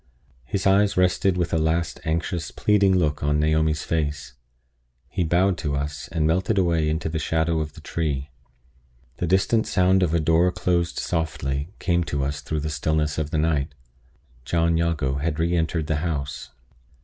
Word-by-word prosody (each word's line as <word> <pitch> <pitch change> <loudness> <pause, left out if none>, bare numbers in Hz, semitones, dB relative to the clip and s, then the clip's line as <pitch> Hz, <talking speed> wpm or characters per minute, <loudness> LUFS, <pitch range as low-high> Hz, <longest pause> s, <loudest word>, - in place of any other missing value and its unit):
His 95 +8 -3
eyes 100 +1 +3
rested 90 0 +2
with 90 -1 -1
a 80 - +3
last 80 -2 0
anxious, 85 +2 -2
pleading 100 -2 +3
look 75 -4 0
on 75 +1 +1
Naomi's 80 0 +1
face. 75 -5 -2 0.7
He 90 - -2
bowed 90 +3 +2
to 75 -3 -2
us, 75 +1 -4
and 80 -2 -1
melted 95 +6 +1
away 85 -4 +2
into 80 +1 -1
the 80 0 -2
shadow 80 0 0
of 75 -1 -4
the - - -13
tree. 75 -4 -3 0.9
The 90 - -2
distant 95 +5 +2
sound 95 0 +3
of 85 -2 +1
a - - +3
door 80 +3 +3
closed 85 -1 0
softly 75 -3 -2
came 85 -2 +1
to 70 -4 -2
us 70 +1 -3
through 80 -1 -3
the 80 - -3
stillness 75 -1 0
of 75 -2 -2
the 80 - -1
night. 75 -2 0 0.7
John 85 +3 +1
Jago 80 -5 0
had 75 +2 -2
re 85 +2 +1
entered 80 -1 0
the 75 0 0
house. 70 -6 -3
80 Hz, 175 wpm, -24 LUFS, 75-85 Hz, 0.9 s, eyes